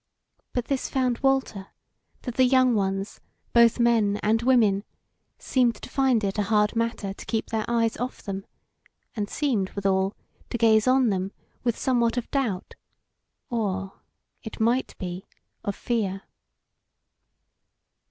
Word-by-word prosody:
But 245 -2 -1
this 275 -2 -2
found 255 -3 0
Walter, 265 -8 0 0.6
that 245 - -4
the 260 - +3
younger 255 -1 +4
ones, 195 0 -2 0.3
both 235 0 +5
men 225 -4 +3
and 220 +2 +2
women, 225 -6 +3 0.5
seemed 245 -3 +1
to - - -11
find 260 -5 +2
it 200 +1 -1
a 200 - -1
hard 210 0 +3
matter 230 -4 -1
to - - -11
keep 225 - -2
their 220 -1 -1
eyes 230 -1 +1
off 250 +3 -5
them; 195 -1 -5 0.7
and 205 -2 -2
seemed, 235 -11 0
withal, 195 0 +1 0.3
to - - -2
gaze 220 0 +4
on 255 -2 +4
them 190 0 -2 0.3
with 235 -2 0
somewhat 240 -2 +1
of 240 - -3
doubt, 240 -10 -1 0.8
or, 195 -4 -2 0.4
it 220 - -8
might 235 +4 +1
be, 180 +1 -6 0.4
of 200 - -2
fear. 200 -5 -2
225 Hz, 140 wpm, -25 LUFS, 200-245 Hz, 0.8 s, both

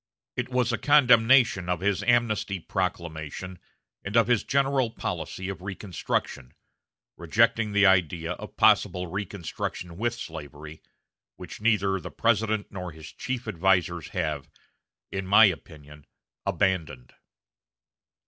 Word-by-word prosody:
It - - -3
was 125 -2 0
a 115 - -1
condemnation 120 -8 +5
of 90 -1 -1
his 100 -1 +1
amnesty 115 -5 +1
proclamation 85 -1 -4 0.4
and 100 +4 -1
of 115 - +5
his 120 -2 +2
general 135 -2 +1
policy 95 -3 -5
of 95 -1 -6
reconstruction, 95 -9 -4 0.6
rejecting 110 +5 +2
the 100 0 +4
idea 90 -3 +2
of - - -8
possible 90 0 +3
reconstruction 90 -2 -5
with 120 +3 -1
slavery, 80 -5 -9 0.5
which - - -10
neither 100 -4 +2
the - - -8
President 110 -2 0
nor 90 -3 -6
his 80 -1 -11
chief 125 -2 -5
advisers 90 -3 +1
have, 75 -5 -3 0.6
in 95 -1 -4
my 105 +3 +8
opinion, 75 -4 -5 0.4
abandoned." 80 -10 -1
95 Hz, 120 wpm, -26 LUFS, 85-115 Hz, 0.6 s, my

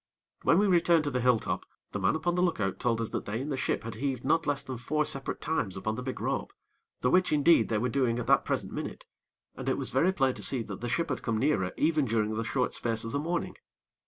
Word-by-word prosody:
When 165 - +4
we 205 - +4
returned 170 -3 +4
to 145 - -2
the 125 -1 0
hill 125 -1 +4
top, - - -3 0.3
the 105 - -3
man 95 +6 +2
upon 165 +2 0
the 180 - +1
look 180 -7 +1
out 95 -2 -1
told 115 -2 +1
us 115 - -2
that - - -4
they 105 +3 -3
in 140 +4 -4
the 140 - -1
ship 130 - -1
had 115 0 -5
heaved 130 +2 -3
not 160 +3 +2
less 145 -1 0
than 130 -2 -5
four 150 +5 0
separate 135 -1 -4
times 120 - -1
upon 110 +3 -2
the 120 - -4
big 130 0 -4
rope, - - -2 0.5
the 125 - +2
which, 185 0 +3
indeed, 150 -4 +4
they 110 - +1
were 120 +4 0
doing 125 -2 +1
at 120 - -3
that - - +4
present - - -2
minute; - - -5 0.5
and - - -4
it - - +1
was - - -2
very 185 - +3
plain 135 -8 +1
to - - -8
see 130 -4 0
that 100 -2 -8
the 120 - -3
ship 165 +6 0
had 130 - -2
come 115 -2 -1
nearer 110 -8 +1
even 155 -2 +2
during 110 -2 0
the 115 +1 -1
short 125 +3 -1
space 115 -1 -1
of 115 - -4
the 140 - -1
morning. 170 +3 -2
130 Hz, 270 wpm, -29 LUFS, 115-155 Hz, 0.5 s, When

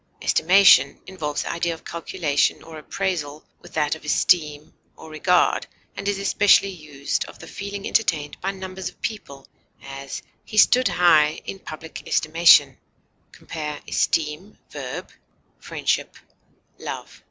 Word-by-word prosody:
Estimation 175 -6 +5
involves 155 -6 -4
the - - -4
idea 170 0 -2
of 160 - -18
calculation 160 -3 -1
or 160 -1 -10
appraisal 155 -3 -4 0.2
with - - -15
that 150 0 +1
of 160 - -8
esteem 150 -1 +1 0.2
or 160 - -12
regard, 180 +3 +2 0.3
and - - -6
is 205 -1 0
especially 200 0 +4
used 150 -5 -4
of - - -13
the - - -11
feeling 200 0 -7
entertained 155 -9 0
by 195 - -1
numbers 190 -1 -6
of - - -21
people; 140 -11 -6 0.4
as, 135 0 -7 0.2
he 215 - -8
stood 250 +4 +5
high 155 -4 +4
in 195 - -6
public 160 -2 -9
estimation. 155 -4 +5 0.5
Compare 150 -2 -6
ESTEEM, 160 +6 -1
v.; - - -5 0.6
FRIENDSHIP; - - -2 0.6
LOVE. - - -7
165 Hz, 130 wpm, -23 LUFS, 150-190 Hz, 0.6 s, Estimation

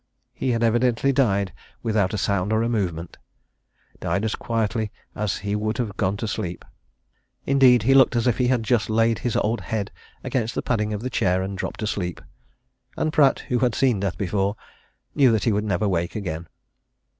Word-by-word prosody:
He - - -2
had 115 -1 +1
evidently 120 +3 +2
died 100 - +1 0.3
without 110 -5 +1
a 105 - -2
sound 100 0 0
or 110 +1 +2
a - - +1
movement 90 -7 -2 0.8
died 90 +6 -1
as 110 - -1
quietly 110 -2 -1 0.2
as 105 -2 -2
he 100 0 0
would 110 +1 -1
have 110 -6 -3
gone 100 -1 0
to 110 - -3
sleep. 90 -4 -4 0.8
Indeed, 130 -4 +5
he 135 +4 +4
looked 130 -2 +5
as 115 - +1
if 125 -1 +1
he 125 - +3
had 125 -2 +1
just 110 -1 +1
laid 115 +1 +2
his 120 - -2
old 115 +3 0
head 110 -4 -3 0.3
against 115 -3 -2
the - - -2
padding 105 -3 0
of 105 -1 -3
the 130 - -3
chair 95 -3 +1
and 95 +1 -4
dropped 95 - -5
asleep, 90 -5 -2 0.8
and 155 - -1
Pratt, 140 -3 +4
who 125 - +1
had 125 -3 +1
seen 125 -6 +2
death 95 -2 -2
before, 100 +1 0 0.6
knew 135 -4 +5
that 110 -3 +1
he 115 - +2
would 105 +1 0
never 100 0 0
wake 85 -3 -1
again. 85 -5 -4
110 Hz, 190 wpm, -23 LUFS, 100-120 Hz, 0.8 s, Indeed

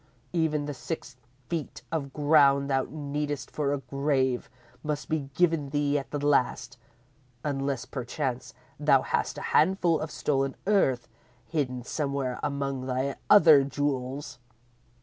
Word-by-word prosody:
Even 155 -3 +1
the 145 - -4
six 130 -1 -6 0.3
feet 165 -3 -4
of 145 -4 -2
ground 140 -1 +4
thou 135 -1 +1
needest 145 -1 -4
for 145 -2 -1
a 145 - +1
grave 135 -2 0 0.3
must 150 -1 -3
be 150 -3 -1
given 165 -5 +2
thee 145 0 +1
at 135 -3 -9
the 145 0 -3
last, 130 -2 +1 0.6
unless, 135 -3 -2
perchance, 130 0 -4 0.2
thou - - +4
hast - - -1
a - - -5
handful 175 -1 +3
of 155 - -4
stolen 135 -2 -1
earth 185 -12 +2 0.4
hidden 130 -5 -2
somewhere 140 -2 -2
among 140 -2 -2
thy 130 +2 -1
other 160 -9 +8
jewels!" 140 -1 -3
140 Hz, 130 wpm, -28 LUFS, 135-150 Hz, 0.6 s, other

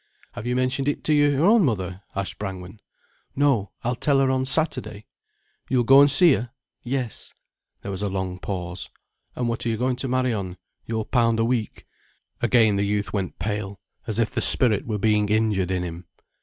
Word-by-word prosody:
"Have 110 - -7
you 125 - 0
mentioned 130 +2 -1
it 145 - -1
to 155 - +1
your 145 +1 +3
own 215 +1 +5
mother?" 95 - -2
asked 100 -1 -4
Brangwen. 95 0 -7 0.6
"No—I'll 125 -4 0
tell 135 +3 +1
her 135 -1 +3
on 130 0 0
Saturday." 130 -7 -1 0.6
"You'll 125 -1 +2
go 135 +4 +7
and 145 - +6
see 165 +2 +5
her?" 120 -1 -3 0.3
"Yes." 125 -2 -4 0.5
There 100 - -5
was 95 0 -5
a 100 - -1
long 95 -1 -4
pause. 90 -2 -5 0.5
"And 125 - -2
what 115 0 -3
are 120 - -1
you 110 - -1
going 125 +1 -1
to 135 - -3
marry 130 -1 0
on—your 105 +3 -6
pound 115 -3 +1
a 115 - +2
week?" 115 -2 -2 0.6
Again 110 -5 +3
the 100 - +1
youth 100 -2 -2
went 95 -3 -3
pale, 105 -2 -4 0.3
as 110 -2 0
if 115 -2 +1
the - - -2
spirit 115 -5 +5
were 110 -2 -2
being 105 0 +1
injured 105 -4 +1
in 90 -1 -1
him. 85 0 -7
115 Hz, 185 wpm, -23 LUFS, 100-130 Hz, 0.6 s, go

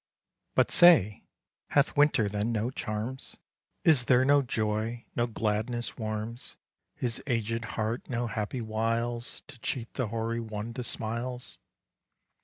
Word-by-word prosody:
But - - +3
say, 160 - +6 0.4
hath 140 0 +2
Winter 145 -7 +4
then 105 +3 -1
no 115 +2 0
charms? 115 +2 -4 0.5
Is 145 -7 +5
there 125 +1 +5
no 145 +1 +5
joy, 110 -1 -1
no 120 0 +1
gladness 115 +2 -2
warms 110 +1 -4 0.4
His 120 -3 -2
aged 115 -2 -1
heart? 110 +2 -2
no 120 -1 -1
happy 115 +1 -3
wiles 115 +2 -2
To 135 -3 -13
cheat 120 0 -3
the 130 -4 -1
hoary 115 +1 -2
one 110 0 -5
to 125 - -4
smiles? 120 +2 -4
115 Hz, 130 wpm, -29 LUFS, 110-125 Hz, 0.5 s, say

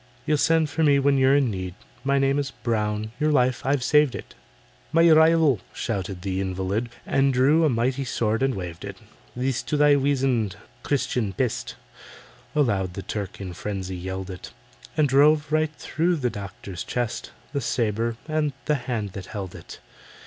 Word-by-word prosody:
"You'll 150 -1 +2
send 160 0 +3
for 145 +2 -3
me 145 -2 +5
when 140 0 +3
you're 135 +1 +5
in 135 -5 +2
need— 95 -2 -5 0.3
My 140 0 +2
name 135 +1 +2
is 140 -1 -2
BROWN—your 110 +3 -1
life 130 -3 +2
I've 135 -1 +1
saved 150 0 +4
it." - - -8 0.6
"My 165 +1 +5
rival!" 160 - +5
shrieked 95 -4 -4
the 95 -1 -1
invalid, 95 +5 -2 0.2
And 135 0 +2
drew 135 +6 +4
a - - +4
mighty 125 +3 0
sword 115 -3 -1
and 135 -2 +1
waved 90 -3 -6
it: - - -7 0.4
"This 130 0 -1
to 150 - -2
thy 145 0 +6
weazand, 130 -7 +1 0.3
Christian 125 -7 -1
pest!" 120 +4 -2 0.8
Aloud 100 -11 +1
the 100 - -5
Turk 100 -4 -5
in 95 -3 -6
frenzy 95 +1 -4
yelled 95 +1 -5
it, 90 -1 -8 0.5
And 155 -2 +4
drove 145 +3 +4
right 155 0 +1
through 175 +4 0
the 125 -6 -1
doctor's 100 -3 -7
chest 120 -2 -3 0.2
The 140 - -1
sabre 115 -1 -1
and 155 -2 0
the 150 - +2 0.2
hand 110 -5 -2
that 95 -1 -8
held 95 -4 -6
it. 85 - -10
125 Hz, 170 wpm, -24 LUFS, 100-145 Hz, 0.8 s, thy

